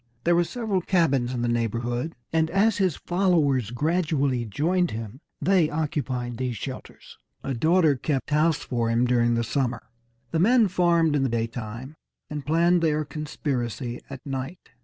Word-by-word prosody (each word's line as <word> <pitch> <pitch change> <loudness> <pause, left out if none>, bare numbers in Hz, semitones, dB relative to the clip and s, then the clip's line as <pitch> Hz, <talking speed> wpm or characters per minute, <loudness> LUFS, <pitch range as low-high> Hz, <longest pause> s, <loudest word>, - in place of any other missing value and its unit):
There 170 0 +3
were 175 - +4
several 215 -1 -2
cabins 140 -10 +1
in 120 -2 -2
the - - +1
neighborhood, 120 +5 -1 0.2
and 160 0 +2
as 200 +4 +2
his 185 -6 +2
followers 160 - +1
gradually 145 -2 0
joined 170 - 0
him, 110 +3 -6 0.2
they 175 0 +3
occupied 130 -6 -2
these 125 -2 -2
shelters. - - -9 0.2
A 135 - -2
daughter 160 +4 +3
kept 135 +2 -2
house 155 +1 +3
for 120 -3 -1
him 115 +2 +2
during 120 -1 +2
the 115 - 0
summer. 125 0 -2 0.4
The 165 - 0
men 225 +3 +4
farmed 170 -4 +3
in 145 - +2
the 135 - +1
daytime, 115 +3 -4 0.4
and 150 -1 -4
planned 170 +3 +3
their 155 -2 +1
conspiracy 135 -5 -4
at 135 -2 -9
night. 135 +5 -5
145 Hz, 160 wpm, -25 LUFS, 120-170 Hz, 0.4 s, were